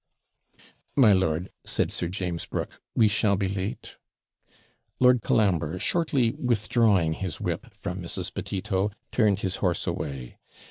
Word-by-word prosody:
'My 120 Hz, -8 st, +6 dB
lord,' 90 Hz, -1 st, 0 dB
said -, -, +1 dB
Sir 85 Hz, -, 0 dB
James 90 Hz, -2 st, -3 dB
Brooke, -, -, -5 dB
'we 110 Hz, -, +5 dB
shall 105 Hz, 0 st, +3 dB
be 100 Hz, 0 st, 0 dB
late.' 95 Hz, +2 st, -4 dB, 1.0 s
Lord 125 Hz, -1 st, +5 dB
Colambre, 90 Hz, -8 st, +1 dB
shortly 135 Hz, -, +1 dB
withdrawing 105 Hz, -8 st, +2 dB
his 90 Hz, -1 st, -5 dB
whip -, -, -3 dB
from 90 Hz, +1 st, -5 dB
Mrs. 85 Hz, -, -4 dB
Petito, 95 Hz, +1 st, -1 dB, 0.2 s
turned 105 Hz, -4 st, +2 dB
his 95 Hz, -1 st, -1 dB
horse 90 Hz, -3 st, 0 dB
away. 65 Hz, -3 st, -5 dB
95 Hz, 130 wpm, -26 LUFS, 90-110 Hz, 1.0 s, My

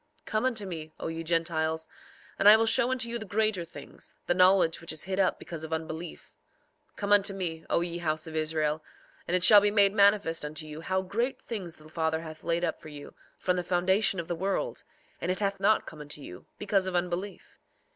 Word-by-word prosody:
4:13 -, -, -46 dB
Come 215 Hz, +3 st, -1 dB
unto 230 Hz, -5 st, 0 dB
me, 160 Hz, -4 st, -7 dB
O -, -, -4 dB
ye 165 Hz, 0 st, -5 dB
Gentiles, 160 Hz, -1 st, 0 dB, 0.5 s
and 200 Hz, -, +8 dB
I 215 Hz, -, +9 dB
will 225 Hz, -, +2 dB
show 235 Hz, +2 st, +3 dB
unto 255 Hz, -2 st, -1 dB
you 235 Hz, 0 st, -2 dB
the -, -, -5 dB
greater 215 Hz, -2 st, 0 dB
things, 165 Hz, -, -10 dB
the -, -, +2 dB
knowledge 180 Hz, -2 st, +4 dB
which 165 Hz, -, -5 dB
is 155 Hz, -, -4 dB
hid 190 Hz, +1 st, -3 dB
up 190 Hz, -, +2 dB
because 165 Hz, -2 st, -8 dB
of 160 Hz, -, -7 dB
unbelief. 160 Hz, +1 st, -6 dB, 0.6 s
4:14 -, -, -41 dB
Come 205 Hz, 0 st, +1 dB
unto 200 Hz, -1 st, +4 dB
me, 165 Hz, -4 st, -4 dB
O -, -, +2 dB
ye 170 Hz, 0 st, -3 dB
house 155 Hz, -2 st, -1 dB
of 160 Hz, -1 st, -8 dB
Israel, 155 Hz, -1 st, 0 dB, 0.4 s
and 175 Hz, -, +1 dB
it 180 Hz, -, -2 dB
shall 205 Hz, +1 st, +9 dB
be 205 Hz, -, +3 dB
made 200 Hz, -1 st, +4 dB
manifest 200 Hz, -6 st, +3 dB
unto 150 Hz, +1 st, -5 dB
you 155 Hz, +1 st, -8 dB
how 190 Hz, +3 st, -1 dB
great 230 Hz, +8 st, -2 dB
things 190 Hz, -8 st, -5 dB
the 155 Hz, -, -16 dB
Father 160 Hz, 0 st, -1 dB
hath 155 Hz, -1 st, -10 dB
laid 170 Hz, +1 st, 0 dB
up 165 Hz, -, -3 dB
for 155 Hz, -, -10 dB
you, 145 Hz, -1 st, -10 dB, 0.2 s
from 180 Hz, 0 st, 0 dB
the 180 Hz, -, -1 dB
foundation 185 Hz, +3 st, +1 dB
of 165 Hz, -, -5 dB
the -, -, -2 dB
world; 195 Hz, -, -2 dB, 0.4 s
and -, -, -2 dB
it 185 Hz, -, -3 dB
hath 200 Hz, -1 st, -1 dB
not 215 Hz, +3 st, +3 dB
come 155 Hz, -2 st, -10 dB
unto 150 Hz, 0 st, -4 dB
you, 90 Hz, -10 st, -11 dB
because 195 Hz, -2 st, 0 dB
of 185 Hz, -, -3 dB
unbelief. 180 Hz, +3 st, -4 dB
175 Hz, 225 wpm, -28 LUFS, 160-200 Hz, 0.6 s, I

